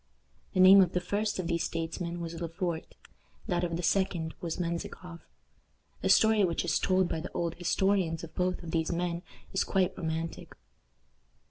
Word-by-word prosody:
The - - +1
name 190 +1 +9
of 180 -2 +2
the 180 - +2
first 205 +4 -1
of 185 - -2
these 170 0 0
statesmen 170 +1 -3
was 165 0 -6
Le 170 - -2
Fort; 170 -1 -4 0.5
that 175 -1 0
of 170 -1 -1
the 175 - -4
second 170 -3 0
was 170 -2 -3
Menzikoff. 170 0 -4 0.8
The - - 0
story 220 -2 +5
which 170 -3 0
is - - +1
told 185 -1 +2
by 160 - -2
the 165 - -7
old 170 -1 -1
historians 180 -2 +1
of 165 -1 -9
both 180 0 -1
of 165 - -6
these 160 0 0
men 170 0 -2 0.3
is 190 - +2
quite 190 -1 +1
romantic. 165 -1 -4
175 Hz, 175 wpm, -30 LUFS, 165-185 Hz, 0.8 s, name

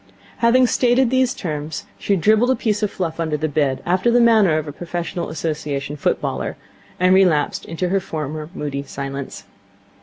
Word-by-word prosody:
Having 245 +2 +4
stated 245 +1 +3
these 260 0 +2
terms, 155 - -5
she 200 - +1
dribbled 215 +7 +3
a 260 - +4
piece 215 -4 -1
of 210 - +1
fluff 170 -4 -4
under 160 -2 -1
the 155 +1 -1
bed, 140 -3 0
after 185 +6 +2
the 240 +1 +4
manner 220 -9 +5
of 155 -1 -3
a - - -4
professional 175 +2 -4
Association 150 -3 -3
footballer, 145 - -2 0.4
and 185 +1 +4
relapsed 180 -6 +2
into 170 +2 -3
her 195 +2 +2
former 155 -4 -5
moody 140 -2 -3
silence. 140 0 -6
170 Hz, 170 wpm, -20 LUFS, 150-215 Hz, 0.4 s, manner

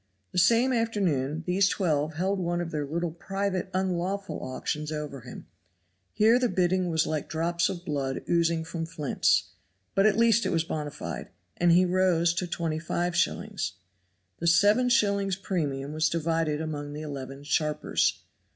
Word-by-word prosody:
The - - +1
same 235 +8 +4
afternoon 170 - 0
these 185 +1 +3
twelve 155 -4 0
held 190 +4 0
one 175 -1 -1
of 170 -1 -3
their 150 -2 -2
little 170 +3 -2
private 195 +2 -3
unlawful 190 +1 -2
auctions 150 +4 -4
over 150 -3 -5
him; 125 - -10 0.7
here 225 +3 +4
the 250 -1 +1
bidding 180 0 +1
was 160 -1 +2
like 155 -2 -3
drops 170 +1 0
of 175 0 -6
blood 140 -4 -2
oozing 170 -1 +2
from 165 0 -4
flints, 150 -4 +1 0.4
but 195 +2 +4
at 215 - +2
least 230 -1 +4
it - - 0
was 165 -1 +1
bona 150 -2 -3
fide, - - -6 0.3
and 175 0 +4
he 180 +2 +5
rose 180 -2 +2
to 180 +1 -2
25s. 170 - -1 0.7
The 170 - -1
seven 205 +8 +5
shillings 200 -5 +2
premium 150 -8 -3
was 155 0 +2
divided 160 -2 0
among 145 -2 -4
the 150 - -6
eleven 135 -2 -7
sharpers. 150 +1 0
170 Hz, 155 wpm, -27 LUFS, 155-190 Hz, 0.7 s, he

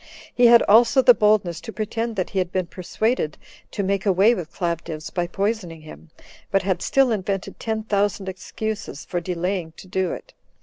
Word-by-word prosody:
He 245 -1 +5
had 235 0 +7
also 230 +5 +5
the 245 - +8
boldness 210 -6 +2
to - - -7
pretend 225 +1 -3
that 185 -3 -2
he 195 - -1
had 180 -1 -1
been 185 -1 -1
persuaded 185 - -2 0.3
to 200 - -3
make 195 0 0
away 200 +3 +4
with 175 -7 -5
Claudius, 165 -3 -4
by 175 -1 -1
poisoning 195 -4 -3
him, 155 +1 -13 0.4
but 195 0 +1
had 190 -1 -1
still 270 -3 +3
invented 195 -2 -3
ten 220 -1 -2
thousand 205 -2 0
excuses 190 -4 -5
for 175 - -2
delaying 180 -1 -3
to - - -12
do 185 -1 -1
it. - - -8
195 Hz, 180 wpm, -23 LUFS, 175-220 Hz, 0.4 s, the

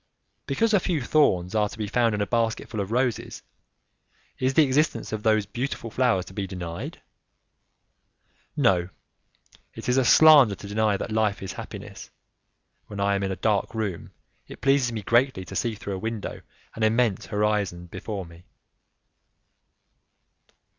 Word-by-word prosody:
Because 220 +11 +1
a 205 - +5
few 175 -3 -1
thorns 95 - +2
are 105 -1 +1
to - - -11
be 110 - -2
found 115 +1 +1
in 105 - -2
a - - +1
basket 115 0 -1
full 110 - -5
of 100 -1 -2
roses, 125 0 -1 1.0
is 130 +1 0
the 160 - +7
existence 135 -5 0
of 110 - -3
those 110 -1 +2
beautiful 120 +1 -4
flowers 115 -7 +1
to - - -12
be 95 -1 -3
denied? 85 -3 -7 1.5
No; 90 -1 +2 0.9
it - - -8
is 125 +1 +2
a 130 - +4
slander 140 -4 +7
to 100 - -10
deny 105 0 +1
that 110 - -5
life 110 -3 0
is 95 0 -5
happiness. - - -9 0.8
When 105 -1 -8
I 100 0 +2
am 100 - 0
in 95 -1 -1
a - - -2
dark 110 +2 0
room, 105 -6 -3 0.4
it - - -11
pleases 135 -3 +3
me 110 -3 -5
greatly 120 -3 +2
to 95 - -9
see 115 +3 -1
through 100 -1 -6
a - - -6
window 110 0 -5 0.3
an 115 - -8
immense 110 -2 +1
horizon 105 -4 -1
before 95 +2 -6
me. 85 +1 -15
110 Hz, 160 wpm, -25 LUFS, 100-120 Hz, 1.5 s, the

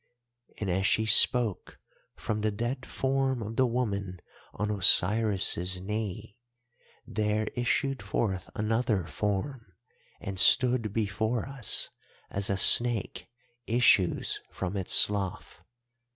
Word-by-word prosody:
"And 105 - -5
as 95 +2 0
she 110 - 0
spoke, 115 -2 +4 0.4
from 110 -1 -5
the 110 - 0
dead 120 +5 -5
form 135 -2 -2
of 110 +2 -7
the 130 +2 +2
woman 100 -7 -4 0.3
on 105 +2 -4
Osiris' 95 -2 +2
knee 105 +2 -6 0.7
there 105 0 -2
issued 135 +2 -2
forth 95 -5 -4
another 110 -3 -1
form 105 - -5 0.5
and 95 -1 -6
stood 125 -3 +3
before 110 +3 -3
us, 135 -5 0 0.4
as 100 0 -3
a 100 - -1
snake 120 +2 +5 0.4
issues 115 -6 +1
from 95 +1 -6
its 95 -2 0
slough. 100 -4 +1
105 Hz, 110 wpm, -27 LUFS, 95-120 Hz, 0.7 s, snake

